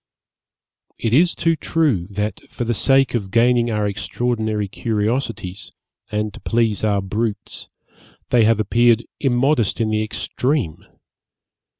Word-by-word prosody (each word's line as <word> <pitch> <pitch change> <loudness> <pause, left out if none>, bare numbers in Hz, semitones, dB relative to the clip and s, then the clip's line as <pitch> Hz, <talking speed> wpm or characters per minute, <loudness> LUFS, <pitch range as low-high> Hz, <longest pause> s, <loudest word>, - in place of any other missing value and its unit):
It 115 -1 -1
is 170 +6 +4
too 165 -1 +1
true 150 - 0
that, 105 0 -3
for - - -4
the 120 0 0
sake 135 +3 +3
of 105 -5 -2
gaining 120 +2 +3
our 105 -2 0
extraordinary 110 0 -2
curiosities, 105 -1 -3 0.4
and 105 -1 -2
to - - -11
please 115 -3 0
our 100 -2 +1
brutes, 105 +1 -4 0.6
they 120 -2 +5
have 110 0 +3
appeared 115 +2 +3
immodest 130 -3 +1
in 110 -1 0
the 110 0 +1
extreme. 120 - -2
115 Hz, 125 wpm, -20 LUFS, 105-120 Hz, 0.6 s, they